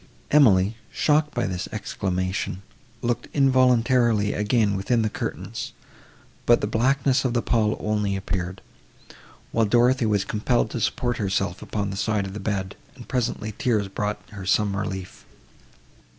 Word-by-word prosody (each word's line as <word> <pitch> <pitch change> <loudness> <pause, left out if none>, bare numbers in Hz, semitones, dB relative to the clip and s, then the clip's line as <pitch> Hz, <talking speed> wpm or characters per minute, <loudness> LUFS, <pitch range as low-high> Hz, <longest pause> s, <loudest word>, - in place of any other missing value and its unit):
Emily, 110 -7 +5
shocked 150 0 +2
by 120 - 0
this 90 -1 -3
exclamation, 95 -2 -3 0.4
looked 120 0 -1
involuntarily 125 -5 +3
again 105 0 +1
within 115 +4 +1
the 110 - -1
curtains, - - -5 0.7
but 120 - +6
the - - -1
blackness 130 +4 +2
of 125 -2 0
the 120 - +2
pall 110 -3 +1
only 105 -2 0
appeared; 95 -1 -4 0.9
while 115 -1 +2
Dorothée 120 +1 +3
was 100 -2 +1
compelled 110 +2 0
to 120 - -3
support 120 +3 0
herself 95 -2 -1
upon 100 -2 -3
the 95 - -5
side 105 -1 0
of 95 - -7
the 105 - -5
bed, 95 -1 -3 0.2
and 125 -3 -12
presently 120 -4 -2
tears 110 -5 0
brought 105 +2 -2
her 100 -2 -8
some 100 +1 +1
relief. 95 -2 -5
105 Hz, 145 wpm, -24 LUFS, 100-120 Hz, 0.9 s, but